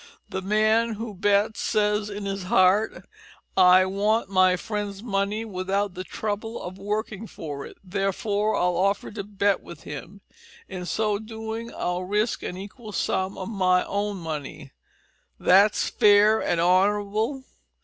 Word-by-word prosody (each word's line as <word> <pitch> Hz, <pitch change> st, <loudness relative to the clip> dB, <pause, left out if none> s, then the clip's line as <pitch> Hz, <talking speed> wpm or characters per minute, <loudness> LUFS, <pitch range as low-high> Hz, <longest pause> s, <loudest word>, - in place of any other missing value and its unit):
The 190 Hz, -, -3 dB
man 215 Hz, +3 st, +2 dB
who 220 Hz, 0 st, -6 dB
bets 205 Hz, +2 st, +1 dB
says 210 Hz, 0 st, +1 dB
in 205 Hz, 0 st, -6 dB
his 195 Hz, -1 st, -3 dB
heart, 190 Hz, +4 st, +3 dB, 0.5 s
`I 185 Hz, 0 st, +6 dB
want 205 Hz, +2 st, +1 dB
my 185 Hz, -1 st, +5 dB
friend's 205 Hz, +1 st, -4 dB
money 205 Hz, 0 st, -1 dB
without 195 Hz, 0 st, -2 dB
the 185 Hz, 0 st, -5 dB
trouble 215 Hz, +4 st, -4 dB
of 185 Hz, +2 st, -8 dB
working 215 Hz, +1 st, -3 dB
for 145 Hz, -7 st, -7 dB
it, -, -, -14 dB
therefore 200 Hz, +2 st, -1 dB
I'll 180 Hz, -1 st, +1 dB
offer 195 Hz, +2 st, 0 dB
to 205 Hz, -2 st, -5 dB
bet 200 Hz, -1 st, 0 dB
with 170 Hz, -, -12 dB
him. 170 Hz, +7 st, -8 dB, 0.5 s
In 180 Hz, -2 st, -6 dB
so 210 Hz, 0 st, 0 dB
doing 225 Hz, +1 st, -6 dB
I'll 180 Hz, +1 st, -2 dB
risk 210 Hz, +5 st, 0 dB
an 180 Hz, -, -5 dB
equal 210 Hz, +3 st, -9 dB
sum 190 Hz, 0 st, -1 dB
of 190 Hz, +1 st, -5 dB
my 185 Hz, -4 st, +2 dB
own 205 Hz, 0 st, -2 dB
money. 150 Hz, -4 st, -6 dB, 0.7 s
That's 200 Hz, +3 st, +4 dB
fair 210 Hz, 0 st, +5 dB
and 170 Hz, -, 0 dB
honourable!' 205 Hz, +8 st, +1 dB
200 Hz, 145 wpm, -25 LUFS, 185-215 Hz, 0.7 s, `I